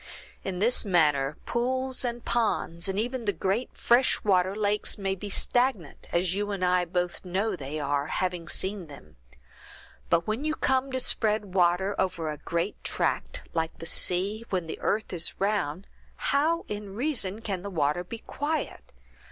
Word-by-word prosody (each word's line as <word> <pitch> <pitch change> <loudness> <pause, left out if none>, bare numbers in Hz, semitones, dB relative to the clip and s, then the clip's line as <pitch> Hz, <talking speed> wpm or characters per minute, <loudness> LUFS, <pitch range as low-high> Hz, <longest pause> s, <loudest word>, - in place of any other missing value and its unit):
In 190 -2 -3
this 230 +6 +3
manner, 150 -7 +3
pools 260 +2 0
and 240 -1 -3
ponds, 195 -6 +1
and 190 - -1
even 245 +1 -2
the 205 - +3
great 195 +7 -1
fresh 245 +2 +3
water 190 -1 +3
lakes, 210 0 +1
may 195 -1 -1
be 200 +2 -6
stagnant, 245 - +1
as 175 +1 +2
you 205 +1 -1
and 195 -3 0
I 180 0 +3
both 175 0 -2
know 195 +3 0
they 150 -1 -5
are, 145 0 0
having 180 0 -2
seen 190 -2 0
them; 105 - -14 0.9
but 170 0 +3
when 220 +6 -2
you 310 0 0
come 265 -1 +1
to 260 - -1
spread 215 -5 +2
water 185 +2 +3
over 165 -4 0
a 150 - -6
great 170 +4 -2
tract, - - -1
like 160 -1 -1
the 165 - -8
sea, 195 +6 0
where 185 -3 +1
the 160 -1 -7
earth 215 -1 0
is 170 -2 0
round, 195 -4 0 0.3
how 320 +4 +1
in 205 -1 -6
reason 230 -6 0
can 195 -5 -3
the 200 - -5
water 160 -1 +1
be 230 +6 -7
quiet? 295 +6 -4
195 Hz, 170 wpm, -28 LUFS, 175-225 Hz, 0.9 s, this